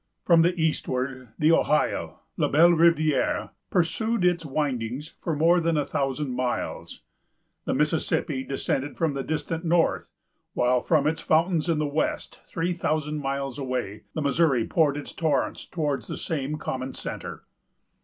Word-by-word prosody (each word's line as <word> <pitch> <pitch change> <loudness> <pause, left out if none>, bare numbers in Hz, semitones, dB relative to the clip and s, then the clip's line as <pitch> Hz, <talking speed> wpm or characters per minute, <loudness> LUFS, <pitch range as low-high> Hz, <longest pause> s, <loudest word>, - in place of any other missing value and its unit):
From 170 -2 +6
the 175 +1 +2
eastward, 130 -5 -1
the 155 +1 +4
Ohio——La 150 -2 0
Belle 165 +4 +6
Rivière——pursued 170 - +1
its 175 -2 +2
windings 135 -2 -3
for 165 - -1
more 165 +4 +4
than 165 -1 +1
a 145 - +1
thousand 140 -1 -2
miles. 125 0 -3 0.6
The - - 0
Mississippi 130 - 0
descended 135 +1 -2
from 160 -3 +1
the 135 - -2
distant 160 +3 -3
north; 170 0 +1 0.5
while 125 0 +2
from 155 -1 +2
its 160 +2 0
fountains 165 +1 +2
in 165 - +2
the 150 - 0
west, 145 +2 -2
three 170 +2 -1
thousand 155 -3 -1
miles 135 -1 -3
away, 125 -6 -4
the 155 - -1
Missouri 140 -4 +2
poured 150 -4 +2
its 145 - -6
torrent 150 -5 -1
towards 150 -5 -2
the - - -5
same 150 -2 -3
common 130 -2 -4
centre. - - -6
150 Hz, 145 wpm, -26 LUFS, 135-165 Hz, 0.6 s, From